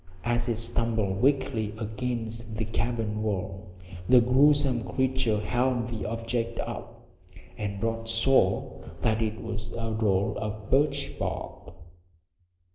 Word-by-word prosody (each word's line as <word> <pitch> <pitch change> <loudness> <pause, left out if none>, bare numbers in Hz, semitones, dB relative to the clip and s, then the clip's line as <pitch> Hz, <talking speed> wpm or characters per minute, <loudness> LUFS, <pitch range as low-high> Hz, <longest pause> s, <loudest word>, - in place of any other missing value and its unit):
As 120 +1 +1
it 115 - +1
stumbled 110 -3 0
weakly 125 -6 +1
against 115 0 -3
the 110 0 -1
cabin 110 -1 -1
wall 95 -2 -3 0.4
the 125 0 +8
gruesome 135 0 +4
creature 130 -1 +1
held 125 +1 0
the 110 -4 -4
object 115 +1 -2
up, 120 0 -6 0.5
and 100 0 -4
Rod 115 0 -1
saw 115 -4 +3 0.2
that 110 +5 +2
it 110 0 -2
was 110 -4 -5
a 115 -1 -3
roll 100 -3 +1
of 105 -1 -5
birch 140 0 +1
bark! - - -5
115 Hz, 120 wpm, -28 LUFS, 105-120 Hz, 0.5 s, the